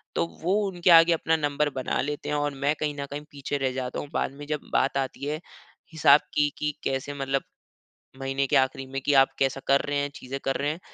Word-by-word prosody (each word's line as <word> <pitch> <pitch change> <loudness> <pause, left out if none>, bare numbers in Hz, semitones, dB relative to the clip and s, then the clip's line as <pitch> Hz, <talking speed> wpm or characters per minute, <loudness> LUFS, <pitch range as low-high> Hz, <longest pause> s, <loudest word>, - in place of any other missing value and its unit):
तो 85 - +2 0.2
वो 185 +3 +2
उनके 180 -1 0
आगे 165 0 +8
अपना 160 0 +1
नंबर 145 0 0
बना 130 - -1
लेते 145 +1 -4
हैं 150 - 0
और 145 -1 0
मैं 140 +2 0
कहीं 150 -1 -1
न 140 - -2
कहीं 145 +1 -4
पीछे 145 0 -3
रह 135 -2 0
जाता 125 -1 -3
हूँ। - - -6
बाद - - 0
में 145 +1 -10
जब 150 -1 -4
बात 135 +1 +2
आती 135 +1 -3
है 150 +2 -2 0.5
हिसाब 150 -2 +6
की, 145 0 +3
कि 150 0 -1
कैसे 135 +1 -2
मतलब, 135 -1 -1 0.8
महीने 135 +1 -1
के - - +1
आखिरी 130 0 +1
में 135 +1 -4
कि 145 - +1
आप 135 0 +7
कैसा 135 0 +1
कर 140 0 +4
रहे 145 - 0
हैं 145 0 0
चीज़े 135 +2 -6
कर 135 - +1
रहे 145 - 0
हैं 160 - -6
140 Hz, 235 wpm, -26 LUFS, 135-150 Hz, 0.8 s, आगे